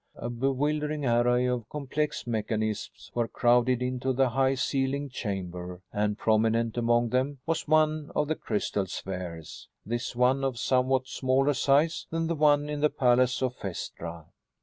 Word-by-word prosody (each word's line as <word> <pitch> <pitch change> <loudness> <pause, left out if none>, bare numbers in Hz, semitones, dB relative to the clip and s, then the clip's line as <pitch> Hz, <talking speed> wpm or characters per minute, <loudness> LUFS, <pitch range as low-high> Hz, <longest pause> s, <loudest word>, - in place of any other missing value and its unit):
A 120 - -5
bewildering 145 +4 -1
array 120 +1 +3
of 125 -3 -2
complex 150 +1 -2
mechanisms 110 -2 -3
was 120 -1 0
crowded 125 +1 +3
into 130 +1 -1
the 130 0 +2
high 135 +2 +2
ceilinged 135 0 -1
chamber 90 -4 -5
and, 105 0 0
prominent 115 +1 +2
among 120 0 +2
them, 130 +4 0
was 165 -1 -1
one 155 -1 +2
of 150 - +1
the 155 - +1
crystal 105 -7 -2
spheres, 90 -4 -6 0.2
this 120 +2 -3
one 130 +3 +3
of 135 -3 -1
somewhat 130 +1 +1
smaller 135 +2 +1
size 145 +4 +2
than 165 0 -1
the 165 - 0
one 145 -1 +3
in 150 0 -3
the 150 - +4
palace 125 -2 +2
of 130 -1 0
Phaestra. 85 -3 -6
125 Hz, 150 wpm, -28 LUFS, 115-140 Hz, 0.2 s, the